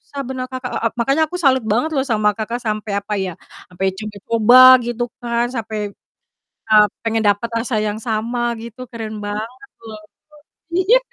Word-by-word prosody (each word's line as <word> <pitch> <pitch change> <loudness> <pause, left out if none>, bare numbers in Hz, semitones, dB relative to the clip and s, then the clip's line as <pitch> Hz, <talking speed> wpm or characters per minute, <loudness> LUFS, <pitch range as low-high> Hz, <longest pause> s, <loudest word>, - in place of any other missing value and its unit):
susah 280 - -9
benar 255 0 -4
Kakak, 255 -1 -6
e - - 0
ep - - -18
makanya 275 +6 +2
aku 360 - -5
salut 260 -6 +3
banget 240 +9 +1
loh 265 - +1
sama 215 -4 +2
Kakak 230 +2 -4
sampai 215 -2 -3
apa 205 +1 -4
ya, 190 -1 -3 0.4
sampai 180 +2 -3
coba-coba 215 +3 +3 0.3
gitu, 240 0 -2 0.2
kan, 235 0 0
sampai, 220 -3 -4 0.9
eee, 210 -1 +7 0.2
pengen 225 -1 0
dapet 205 +3 +2
rasa 230 +1 -2
yang 210 0 -2
sama 235 +1 -1
gitu 235 +2 -9
keren 220 -2 -6
banget, 225 +6 -6
loh. 215 -1 -9 0.7
Iya. 375 +8 +4
230 Hz, 165 wpm, -19 LUFS, 215-255 Hz, 0.9 s, eee